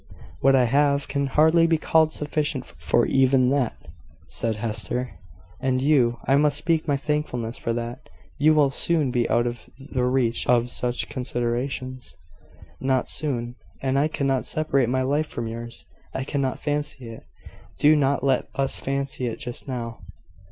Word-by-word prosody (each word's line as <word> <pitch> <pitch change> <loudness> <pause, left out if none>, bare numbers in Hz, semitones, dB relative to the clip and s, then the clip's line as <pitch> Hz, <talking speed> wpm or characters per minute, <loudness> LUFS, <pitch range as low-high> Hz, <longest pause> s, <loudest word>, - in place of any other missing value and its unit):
"What 135 0 +4
I 130 - +5
have 140 +3 +2
can 140 0 -1
hardly 160 +4 +4
be 165 -1 +3
called 160 0 +3
sufficient 150 -3 -2
for 120 - 0
even 130 -1 +3
that," 135 -4 +1 0.5
said 115 -1 -2
Hester: 110 +3 -3 0.4
"and 130 -1 0
you 130 -4 +3
I 135 - +4
must 145 -1 +3
speak 165 +1 0
my 145 -2 +2
thankfulness 135 -6 -2
for 115 - -2
that 120 +3 -5 0.3
you 155 +2 +5
will 145 -3 +4
soon 150 -1 +1
be 120 -2 0
out 120 +1 +2
of 120 0 -5
the 135 -2 -3
reach 125 -2 0
of 120 0 +3
such 125 0 -1
considerations." 125 -3 -3 0.6
"Not 130 -1 0
soon: 120 -5 -2 0.3
and 135 0 +1
I 150 - +3
cannot 135 -4 0
separate 140 -6 +1
my 130 +1 +1
life 145 +4 0
from 120 - -5
yours 115 +1 -7 0.3
I 130 - -1
cannot 135 -2 -1
fancy 145 -4 -3
it. 115 - -11 0.5
Do 150 +1 +5
not 140 -1 +1
let 135 -2 +1
us 135 -1 0
fancy 135 -2 -1
it 115 - -4
just 125 -1 -6
now." 115 -4 -5
135 Hz, 160 wpm, -24 LUFS, 120-145 Hz, 0.6 s, I